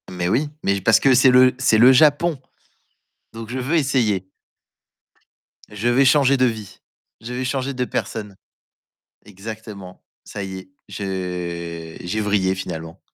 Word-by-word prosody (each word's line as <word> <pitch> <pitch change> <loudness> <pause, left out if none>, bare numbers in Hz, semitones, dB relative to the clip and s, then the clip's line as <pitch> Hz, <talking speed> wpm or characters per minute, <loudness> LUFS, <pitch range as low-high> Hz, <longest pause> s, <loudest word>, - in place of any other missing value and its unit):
Mais 90 -1 -3
oui, 130 +10 0
mais 100 0 0
parce 115 +4 +4
que 135 - +4
c'est 130 +2 +5
le 125 0 +6
c'est 125 -4 +3
le 120 +4 +7
Japon. 150 +3 +3 0.9
Donc 115 0 -9
je 130 - -4
veux 130 +6 -1
essayer. 120 - +1 1.4
Je 105 +2 -4
vais 130 +3 +3
changer 140 0 +4
de 130 - +3
vie. 110 -5 -4 0.4
Je 120 +2 -7
vais 130 +1 -3
changer 135 +1 -2
de 125 -1 -2
personne. 105 -4 -5 0.9
Exactement. 105 -2 -10 0.2
Ça 100 - -7
y 95 -1 -6
est, 95 0 -13 0.2
je 85 -4 -5
j'ai 95 +5 -2
vrillé 100 -3 +1
finalement. 85 -2 -7
110 Hz, 145 wpm, -21 LUFS, 95-130 Hz, 1.4 s, le